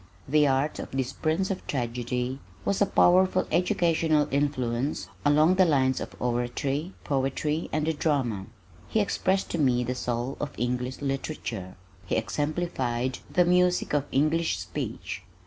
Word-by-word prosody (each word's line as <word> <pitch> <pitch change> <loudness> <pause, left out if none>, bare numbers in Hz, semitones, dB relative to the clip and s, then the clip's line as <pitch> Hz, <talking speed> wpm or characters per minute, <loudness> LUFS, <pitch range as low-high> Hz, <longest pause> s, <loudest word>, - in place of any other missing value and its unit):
The 150 +1 +4
art 135 +3 +1
of - - -5
this 135 0 -2
"Prince 170 +5 0
of 190 - -5
Tragedy" 125 0 -2 0.3
was 200 - 0
a 205 - +5
powerful 185 0 +4
educational 165 -3 +2
influence 135 -1 0 0.2
along 150 +4 +5
the 190 - +6
lines 130 -5 +2
of - - -8
oratory, 125 +7 -1
poetry 140 +3 -1
and 155 0 0
the 160 - +1
drama. 130 -11 0 0.4
He 220 - +1
expressed 195 -2 0
to 170 - -1
me 125 -4 +3
the 125 +1 -2
soul 125 +1 -3
of 150 - -4
English 125 +2 -2
Literature. 135 -9 -4 0.3
He - - 0
exemplified 130 0 -1
the 180 - +4
music 180 -1 +2
of 145 -1 +2
English 155 +4 +2
speech. - - -5
140 Hz, 145 wpm, -27 LUFS, 125-160 Hz, 0.4 s, the